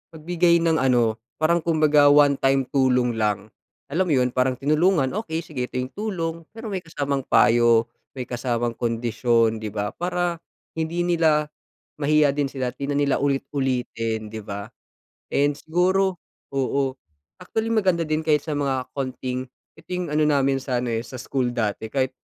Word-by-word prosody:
magbigay 170 Hz, +2 st, +2 dB
ng 165 Hz, -1 st, +3 dB
ano, 120 Hz, -4 st, +2 dB, 0.2 s
parang 165 Hz, +1 st, +2 dB
kumbaga 155 Hz, -3 st, +4 dB
1 145 Hz, -1 st, +6 dB
time 135 Hz, 0 st, +3 dB
tulong 125 Hz, -3 st, +2 dB
lang, 105 Hz, -1 st, 0 dB, 0.4 s
alam 170 Hz, +6 st, +2 dB
mo -, -, 0 dB
yun, 125 Hz, -1 st, +2 dB
parang 130 Hz, 0 st, +2 dB
tinulungan, 155 Hz, -1 st, +2 dB
okey 165 Hz, -7 st, -3 dB
sige, 135 Hz, -6 st, -5 dB
ito -, -, -12 dB
yung 130 Hz, +1 st, -4 dB
tulong. 185 Hz, -6 st, -2 dB, 0.2 s
Pero 225 Hz, +1 st, -8 dB
may 190 Hz, -3 st, -4 dB
kasamang 140 Hz, -4 st, -2 dB
payo, 115 Hz, -1 st, +4 dB, 0.3 s
may 125 Hz, -2 st, -5 dB
kasamang 120 Hz, -1 st, -2 dB
kondisyon, 115 Hz, -1 st, +1 dB
'di 105 Hz, -, -4 dB
ba, 105 Hz, 0 st, -3 dB
para 175 Hz, 0 st, -1 dB, 0.4 s
hindi 165 Hz, +2 st, -1 dB
nila 160 Hz, -3 st, +2 dB, 0.5 s
mahiya 150 Hz, -1 st, +3 dB
din 145 Hz, -2 st, -1 dB
sila 130 Hz, -2 st, -2 dB
at -, -, -38 dB
di 140 Hz, -, -5 dB
na 140 Hz, -, 0 dB
nila 140 Hz, -1 st, +2 dB
ulit-ulitin, 130 Hz, -5 st, -1 dB
'di 110 Hz, +1 st, -7 dB
ba? 100 Hz, 0 st, -6 dB, 0.6 s
And 145 Hz, +1 st, +2 dB
siguro 180 Hz, +5 st, +1 dB, 0.3 s
oo. 135 Hz, 0 st, 0 dB, 0.5 s
Actually, 220 Hz, +5 st, -3 dB
maganda 190 Hz, -6 st, +2 dB
din 155 Hz, 0 st, -1 dB
kahit 150 Hz, -2 st, +3 dB
sa 150 Hz, -, -1 dB
mga 135 Hz, -3 st, -1 dB
konting 130 Hz, -1 st, -3 dB, 0.3 s
ito 160 Hz, 0 st, -19 dB
yung 180 Hz, -1 st, -2 dB
ano 150 Hz, +1 st, +2 dB
namin 140 Hz, -2 st, +2 dB
sana 125 Hz, -2 st, -2 dB
eh, 115 Hz, 0 st, -2 dB
sa 130 Hz, -1 st, -8 dB
school 125 Hz, -1 st, -1 dB
dati, 110 Hz, -2 st, -2 dB
kahit 130 Hz, -1 st, +1 dB
140 Hz, 165 wpm, -23 LUFS, 125-160 Hz, 0.6 s, 1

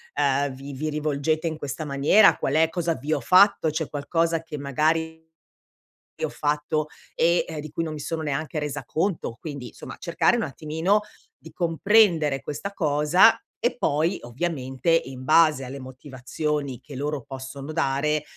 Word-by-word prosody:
uhm, 140 Hz, 0 st, +2 dB
vi 140 Hz, +1 st, -9 dB
vi 155 Hz, +4 st, -3 dB
rivolgete 150 Hz, +1 st, -1 dB
in 160 Hz, -1 st, -3 dB
questa 145 Hz, +2 st, -5 dB
maniera, 145 Hz, +9 st, +5 dB
qual 140 Hz, -, -1 dB
è 160 Hz, 0 st, +4 dB
cosa 170 Hz, 0 st, -1 dB
vi 145 Hz, +3 st, -3 dB
ho 150 Hz, -, +1 dB
fatto, 180 Hz, -, +5 dB
c'è 155 Hz, 0 st, -2 dB
qualcosa 165 Hz, +3 st, 0 dB
che 165 Hz, -2 st, -7 dB
magari 160 Hz, +4 st, 0 dB, 0.9 s
che -, -, -2 dB
ho -, -, -4 dB
fatto, 150 Hz, +1 st, -1 dB, 0.3 s
e, 170 Hz, +1 st, +3 dB
ehm, 160 Hz, -2 st, -6 dB
di 155 Hz, -, -9 dB
cui 165 Hz, -, -2 dB
non 155 Hz, -1 st, -4 dB
mi 150 Hz, -, -7 dB
sono 160 Hz, +2 st, -3 dB
neanche 155 Hz, +1 st, -2 dB
resa 145 Hz, -2 st, -4 dB
conto", 160 Hz, -, -2 dB
quindi 140 Hz, -6 st, -6 dB
insomma -, -, -10 dB
cercare 170 Hz, +6 st, +2 dB
un 230 Hz, -, -1 dB
attimino 160 Hz, +8 st, 0 dB, 0.4 s
di 160 Hz, -, -12 dB
comprendere 170 Hz, -, +3 dB
questa 200 Hz, -, -5 dB
cosa, 155 Hz, +5 st, +4 dB, 0.2 s
e 240 Hz, +1 st, 0 dB
poi 160 Hz, -1 st, 0 dB
ovviamente 130 Hz, +2 st, -3 dB
in 135 Hz, -6 st, +1 dB
base 155 Hz, -2 st, +4 dB
alle 135 Hz, +2 st, -7 dB
motivazioni, 130 Hz, +1 st, -4 dB
che 145 Hz, -, -11 dB
loro 145 Hz, +1 st, -3 dB
possono 135 Hz, +3 st, -8 dB
dare, 150 Hz, 0 st, 0 dB
150 Hz, 165 wpm, -25 LUFS, 140-165 Hz, 0.9 s, maniera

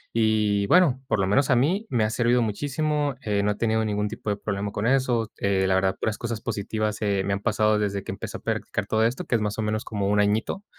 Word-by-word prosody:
Y 105 Hz, -3 st, +2 dB
bueno, 140 Hz, -8 st, +4 dB
por -, -, +1 dB
lo 95 Hz, -, +2 dB
menos 130 Hz, +8 st, +2 dB
a 130 Hz, -, +5 dB
mí 180 Hz, -, +1 dB
me 115 Hz, -3 st, +1 dB
ha 110 Hz, -, +1 dB
servido 120 Hz, +1 st, +2 dB
muchísimo, 145 Hz, +5 st, -1 dB
eh, 105 Hz, -5 st, 0 dB
no 105 Hz, -, +2 dB
he 105 Hz, -, -2 dB
tenido 110 Hz, 0 st, +1 dB
ningún 105 Hz, -1 st, -1 dB
tipo 110 Hz, -1 st, -6 dB
de 100 Hz, -, 0 dB
problema 100 Hz, -1 st, -3 dB
con 105 Hz, +2 st, -3 dB
eso, 125 Hz, -4 st, +1 dB
eh, 95 Hz, -1 st, +1 dB
la 95 Hz, -, +2 dB
verdad, 95 Hz, 0 st, +1 dB
puras 110 Hz, -, -2 dB
cosas 115 Hz, -2 st, -3 dB
positivas, 110 Hz, -1 st, -3 dB
eh, 100 Hz, -2 st, +1 dB
me 100 Hz, -, 0 dB
han 100 Hz, -, -1 dB
pasado 110 Hz, 0 st, +2 dB
desde 100 Hz, -2 st, -2 dB
que -, -, -5 dB
empecé -, -, -6 dB
a -, -, -14 dB
practicar -, -, -3 dB
todo 110 Hz, 0 st, +1 dB
esto, 120 Hz, +3 st, -1 dB
que -, -, -4 dB
es 110 Hz, -, +1 dB
más 105 Hz, 0 st, -2 dB
o 110 Hz, -, -1 dB
menos 110 Hz, 0 st, -1 dB
como 100 Hz, -3 st, -2 dB
un 105 Hz, +1 st, +2 dB
añito. 105 Hz, -, 0 dB
110 Hz, 255 wpm, -25 LUFS, 105-120 Hz, -, a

